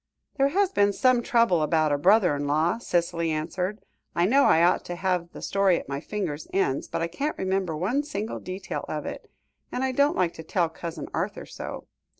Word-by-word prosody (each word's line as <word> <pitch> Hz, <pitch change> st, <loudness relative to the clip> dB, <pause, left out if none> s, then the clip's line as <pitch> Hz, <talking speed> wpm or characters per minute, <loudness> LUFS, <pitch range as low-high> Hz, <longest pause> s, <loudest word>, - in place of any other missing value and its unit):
"There 275 Hz, 0 st, +4 dB
has 385 Hz, +6 st, +1 dB
been 205 Hz, -, +3 dB
some 255 Hz, +1 st, +3 dB
trouble 230 Hz, -, +3 dB
about 155 Hz, 0 st, +2 dB
a 145 Hz, -, +2 dB
brother 185 Hz, -1 st, +4 dB
in 145 Hz, 0 st, -3 dB
law," 160 Hz, +9 st, +1 dB
Cicely 170 Hz, -5 st, 0 dB
answered. 180 Hz, +6 st, -3 dB, 0.3 s
"I 170 Hz, -, +3 dB
know 275 Hz, +7 st, +4 dB
I 165 Hz, -, +5 dB
ought 175 Hz, -, +3 dB
to 175 Hz, -, -5 dB
have 180 Hz, -2 st, -1 dB
the -, -, -10 dB
story 195 Hz, -3 st, +2 dB
at -, -, -11 dB
my 140 Hz, 0 st, -3 dB
fingers' 160 Hz, -6 st, -4 dB
ends, 165 Hz, -9 st, 0 dB
but -, -, -2 dB
I -, -, 0 dB
can't 280 Hz, -, -3 dB
remember 190 Hz, -4 st, -1 dB
one 215 Hz, -, 0 dB
single 220 Hz, -7 st, -4 dB
detail 185 Hz, +1 st, -5 dB
of -, -, -3 dB
it, -, -, -7 dB, 0.4 s
and 255 Hz, -, -2 dB
I 265 Hz, -, +1 dB
don't 280 Hz, +3 st, +2 dB
like 175 Hz, -2 st, +1 dB
to 160 Hz, -, -9 dB
tell 170 Hz, 0 st, 0 dB
Cousin 165 Hz, -2 st, -6 dB
Arthur -, -, -3 dB
so. -, -, -7 dB
185 Hz, 205 wpm, -26 LUFS, 165-225 Hz, 0.4 s, I